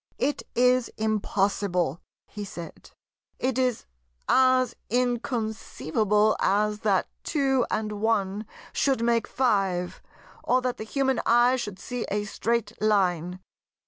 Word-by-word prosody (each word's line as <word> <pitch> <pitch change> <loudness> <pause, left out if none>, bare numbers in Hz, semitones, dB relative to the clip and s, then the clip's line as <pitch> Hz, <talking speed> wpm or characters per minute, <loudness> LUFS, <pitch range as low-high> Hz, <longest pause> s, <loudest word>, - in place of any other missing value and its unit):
"It 290 - 0
is 250 0 +3
impossible," 195 -6 0 0.2
he 210 - -7
said; 170 -4 -9 0.5
"it 260 0 -1
is 250 -3 0 0.4
as 255 -2 +4
inconceivable 220 - 0
as 210 +2 +1
that 200 -4 +1 0.2
two 270 -5 +1
and 210 -1 -2
one 210 -2 0 0.3
should 265 -4 +1
make 235 -1 +2
five, 195 -8 0 0.4
or 255 - +3
that 250 -1 -1
the 220 - -6
human 265 +1 0
eye 240 +2 +5
should 205 -7 -4
see 245 +4 -5
a 205 +1 -1
Straight 215 0 -2
Line." 185 -4 +1
220 Hz, 115 wpm, -26 LUFS, 200-250 Hz, 0.5 s, eye